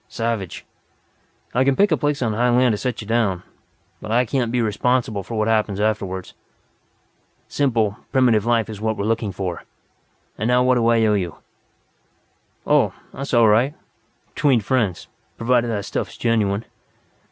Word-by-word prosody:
Savage. 115 -5 -3 0.9
I 125 - +3
can 135 0 +2
pick 205 +3 +3
a - - +5
place 145 -2 -1
on 110 -2 0
high 120 +3 +1
land 125 -1 +3
to - - -1
set 125 0 -3
you 105 - -9
down. 105 -6 0 0.6
But 105 - -6
I 120 +2 +3
can't 120 -1 -1
be 125 - 0
responsible 115 0 0
for 115 +5 -7
what 110 0 +1
happens 110 -3 +1
afterward." 100 -3 -2 1.2
"Simple, 115 -7 0
primitive 125 -6 +3
life 115 -1 +1
is 105 -2 -8
what 110 0 -1
we're 100 - -2
looking 110 -2 -1
for. 90 -2 -5 0.8
And 110 - -1
now 125 +1 +3
what 130 0 +4
do 120 -2 +2
I 115 -1 +4
owe 105 - +3
you 90 -5 -2 0.7
" - - -42
"Oh, - - +3 0.2
that's 140 +1 -6
all 115 -1 +6
right. 120 +8 +3 0.6
Between 135 -5 +3
friends. 105 -4 -1 0.3
Provided 120 +1 +2
that 105 -3 -2
stuff's - - -4
genuine! 110 -3 0
115 Hz, 165 wpm, -21 LUFS, 105-125 Hz, 1.2 s, all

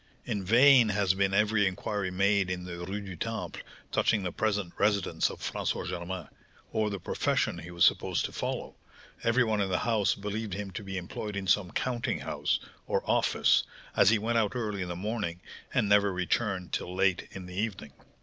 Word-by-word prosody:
In 100 -2 -2
vain 120 +3 +6
has 100 -2 +2
been 95 0 +1
every 105 +1 +3
inquiry 100 +1 -2
made 100 +1 +2
in 90 -1 -3
the 90 -1 -7
Rue 100 +2 -3
du 95 -3 -7
Temple - - -4 0.3
touching 105 -3 +2
the 90 - -2
present 105 -4 -1
residence 100 -1 +2
of - - -9
François - - -2
Germain, 85 -1 -4 0.4
or 110 -1 +1
the 100 - -3
profession - - 0
he 85 - -9
was 85 -1 +3
supposed - - +2
to - - -5
follow; - - -3 0.5
every 120 +2 +4
one 110 -3 +1
in 95 - 0
the 90 - +1
house 105 -4 +1
believed 105 0 -4
him 100 -1 -5
to 105 - -6
be 95 -1 -5
employed 100 +3 -5
in 100 -1 -3
some 95 -1 +2
counting 120 +2 -2
house, - - -1 0.3
or - - 0
office, - - +3 0.3
as - - +6
he 115 - +4
went 115 +2 +1
out 105 +1 0
early 105 -5 -2
in 90 - -2
the 85 - -3
morning 100 -3 -3 0.3
and - - +2
never 100 0 +4
returned 90 0 -1
till 90 - -3
late 95 -1 +2
in 95 -1 -7
the 90 - -9
evening. 95 -7 -3
100 Hz, 195 wpm, -29 LUFS, 90-105 Hz, 0.5 s, vain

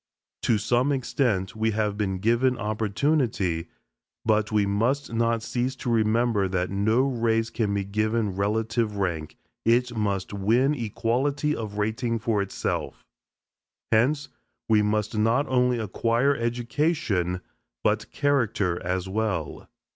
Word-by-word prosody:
To 115 - +2
some 120 +6 +1
extent 120 -8 0
we 110 +1 +1
have 105 -2 0
been 100 -3 -1
given 120 +5 +2
opportunity, 105 - 0 0.6
but 110 0 +2
we 105 -1 +3
must 115 +7 0
not 115 0 +1
cease 125 +3 -2
to 120 - -3
remember 110 -2 +2
that 90 -1 -1
no 110 +5 +2
race 115 -3 0
can 110 -3 -1
be 100 - 0
given 110 0 -1
relative 110 +2 0
rank 85 -6 -2 0.3
it 120 +1 +2
must 100 -3 -1
win 115 +8 +2
equality 135 +5 0
of 105 -2 -5
rating 115 +3 -1
for 110 -2 0
itself. 100 - -3 0.9
Hence, 135 +7 +2 0.4
we 110 -1 +4
must 105 +1 0
not 115 +6 +2
only 125 -1 +2
acquire 115 +5 +1
education, 120 - 0 0.4
but 110 +1 +1
character 115 - 0
as 90 +1 -2
well. 95 -6 -2
110 Hz, 125 wpm, -26 LUFS, 100-120 Hz, 0.9 s, we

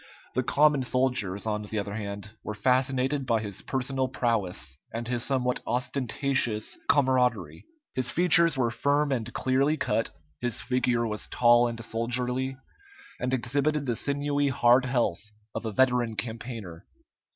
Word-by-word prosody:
The 130 - +1
common 145 +2 +3
soldiers, 125 -7 0
on 105 -1 -1
the 105 +1 -5
other 100 0 -3
hand, 100 -1 -5
were 105 - -5
fascinated 130 +3 +1
by 115 -2 +2
his 105 -3 -5
personal 130 0 -1
prowess 100 - -1
and 115 +1 -4
his 120 -1 -1
somewhat 125 -2 0
ostentatious 125 - -1
camaraderie. 125 - +2 0.3
His 130 -1 -1
features 170 -3 +4
were 120 -3 +1
firm 145 +4 +1
and 120 -3 -2
clearly 135 +5 +1
cut; 115 - 0 0.3
his 120 -1 -1
figure 125 -2 +1
was 105 -1 -3
tall 120 0 +5
and 115 -1 -5
soldierly, 125 +3 -1 0.6
and 125 - -1
exhibited 140 +4 0
the 120 -3 0
sinewy 145 +2 0
hard 125 0 +4
health 120 -8 0 0.3
of 115 - -4
a - - -2
veteran 125 -1 +2
campaigner. 110 -5 -6
125 Hz, 140 wpm, -27 LUFS, 115-130 Hz, 0.6 s, tall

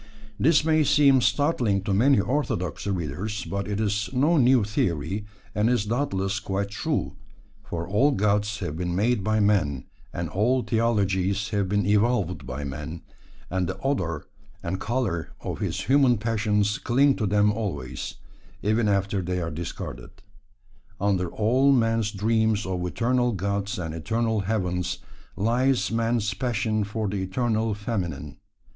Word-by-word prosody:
This 150 +1 +4
may 160 -1 +4
seem 140 -2 +5
startling 120 - +1
to 100 - -1
many 125 +5 +4
orthodox 100 - -1
readers, 95 +3 -3
but 100 0 -3
it 105 0 -2
is 105 -1 0
no 145 +6 +3
new 130 -4 +5
theory, 95 0 -1 0.3
and 105 +2 +2
is 120 -4 +1
doubtless 105 -5 -1
quite 100 0 -3
true, 100 - -2 0.5
for 85 0 -5
all 105 +9 +3
gods 105 -2 +1
have 75 - -3
been 90 +1 -2
made 105 +2 +1
by 110 +2 +1
man, 95 -10 +1 0.3
and 85 0 -3
all 120 - +1
theologies 100 -3 +1
have 100 -2 0
been 105 +1 +1
evolved 105 -4 +1
by 65 +3 -4
man, 75 +4 -6 0.5
and 95 -1 0
the 95 - -4
odour 90 - -1 0.4
and 90 +2 -2
the - - -13
colour 110 -9 -2
of - - -5
his - - -2
human 135 -3 +4
passions 105 -2 0
cling 135 +3 +3
to 110 - 0
them 105 +1 +3
always, 95 - -4 0.5
even 110 +2 +2
after 100 -1 +1
they 90 0 -2
are 85 -1 -3
discarded. 75 -6 -7 0.8
Under 95 -3 +1
all 125 +9 +3
man's 115 -4 +2
dreams 110 +1 +1
of 90 -1 -2
eternal 120 +4 +1
gods 100 +1 -2
and 80 -3 -4
eternal 110 +7 -1
heavens 90 -3 -1 0.4
lies 120 +5 +1
man's 115 -2 0
passion 110 -1 -1
for 105 +1 -3
the 100 +1 -2
eternal 110 +2 0
feminine. 90 - -4
105 Hz, 150 wpm, -25 LUFS, 95-115 Hz, 0.8 s, seem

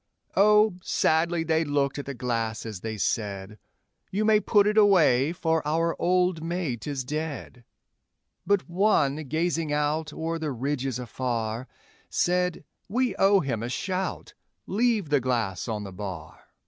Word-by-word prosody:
Oh, 210 -1 +5
sadly 165 0 +1
they 160 0 +1
looked 145 -2 0
at 140 - -7
the 140 - -4
glass 115 -3 -2
as 110 -4 -6
they 110 +2 -5
said, 100 0 -2 0.5
'You 210 +3 -1
may 215 -1 +5
put 205 -1 +3
it 210 0 +1
away, 165 - +5
for 160 -2 0
our 165 +3 0
old 180 -2 +2
mate 165 -7 -3
is 140 -3 -2
dead;' 150 -3 -5 0.8
But 200 -1 +1
one, 170 -6 +2
gazing 160 +2 -1
out 150 +1 0
o'er 165 +2 -3
the 155 -3 -2
ridges 135 0 -2
afar, 120 -1 -3 0.4
Said, 180 -1 0 0.3
'We 245 -1 0
owe 195 0 +5
him 120 -6 -2
a 120 - -3
shout 185 +7 -3 0.3
leave 215 -4 +1
the 145 -1 +3
glass 120 -7 -1
on 110 -3 -3
the 100 - -7
bar.' 90 -4 -8
150 Hz, 145 wpm, -26 LUFS, 125-180 Hz, 0.8 s, Oh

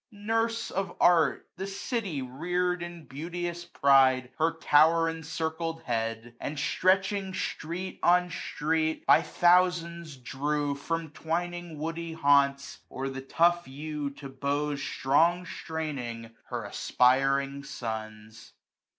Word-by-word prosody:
Nurse 225 +2 -1
of 195 0 -3
art! 165 -6 +4
the 190 +1 -4
city 195 - -3
rear'd 175 +7 -1
In 175 -2 -7
beauteous 175 +4 -5
pride 135 -5 +4
her 160 +1 +2
tower 160 +1 +4
encircled 165 0 -3
head; 115 0 -3
And, 150 - -4
stretching 190 +4 +1
street 180 +2 -4
on 180 0 +4
street, 160 -2 -1
by - - +6
thousands 170 -3 +2
drew^ 145 +3 -2
115: 140 0 -11
From 165 -1 -1
twining 175 +1 -3
woody 165 +2 -4
haunts, 140 -2 +2
or 135 +1 -4
the 135 0 -6
tough 170 +5 +2
yew 145 +1 -4
To* 140 0 -10
bows 140 +2 -2
strong 165 +7 +2
straining, 130 -11 -5
her - - -4
aspiring 135 +2 +2
sons. 110 -4 -7
160 Hz, 115 wpm, -28 LUFS, 140-175 Hz, -, by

